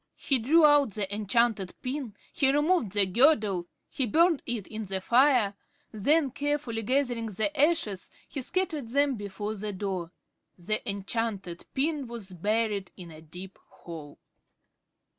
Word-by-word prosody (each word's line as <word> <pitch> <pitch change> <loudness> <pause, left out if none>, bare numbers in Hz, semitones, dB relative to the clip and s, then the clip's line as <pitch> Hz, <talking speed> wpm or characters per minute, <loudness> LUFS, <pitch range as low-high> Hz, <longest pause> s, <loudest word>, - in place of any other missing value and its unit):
He 270 -3 +2
drew 305 +8 +5
out 290 -7 +5
the 205 -2 -3
enchanted 210 -1 +1
pin. 255 -4 -4 0.2
He 270 -2 +3
removed 295 - +2
the 205 -1 +4
girdle. 210 - +3 0.2
He 260 - -1
burned 330 - +3
it 230 -5 -3
in 220 0 -6
the 190 0 -3
fire. 240 -1 +4 0.4
Then, 275 +7 +2
carefully 285 -4 -2
gathering 245 -1 0
the 220 +9 -2
ashes, 290 - +1 0.2
he 280 - -5
scattered 320 -3 -2
them 280 +3 +2
before 205 -1 -5
the 210 0 -5
door. 185 -3 -4 0.5
The 205 +5 -2
enchanted 200 -3 -3
pin 285 -1 0
was 225 -5 -7
buried 205 +1 -1
in 175 -2 -10
a 155 0 -12
deep 180 +4 -11
hole. 155 -4 -11
225 Hz, 140 wpm, -28 LUFS, 195-280 Hz, 0.5 s, drew